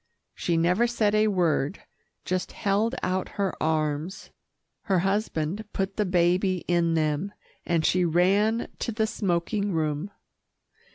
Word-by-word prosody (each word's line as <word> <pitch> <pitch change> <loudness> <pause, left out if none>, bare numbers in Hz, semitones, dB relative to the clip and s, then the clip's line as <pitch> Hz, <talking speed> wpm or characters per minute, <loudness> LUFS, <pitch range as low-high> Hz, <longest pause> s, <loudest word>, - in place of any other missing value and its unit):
She 170 -2 -1
never 180 +8 +3
said 220 -3 +1
a 215 0 +4
word, 175 -4 0 0.4
just 185 0 -2
held 215 +4 0
out 185 0 -1
her 200 -2 0
arms. 155 +3 -1 0.5
Her 195 -4 +2
husband 195 -1 -1
put 195 0 -2
the 210 -2 0
baby 180 +1 +2
in 170 -1 +2
them, 155 +5 0 0.3
and 165 -2 +1
she 180 0 +3
ran 195 +7 +2
to - - -2
the 220 0 0
smoking 200 -1 -1
room. 155 +2 -1
185 Hz, 130 wpm, -26 LUFS, 170-205 Hz, 0.5 s, a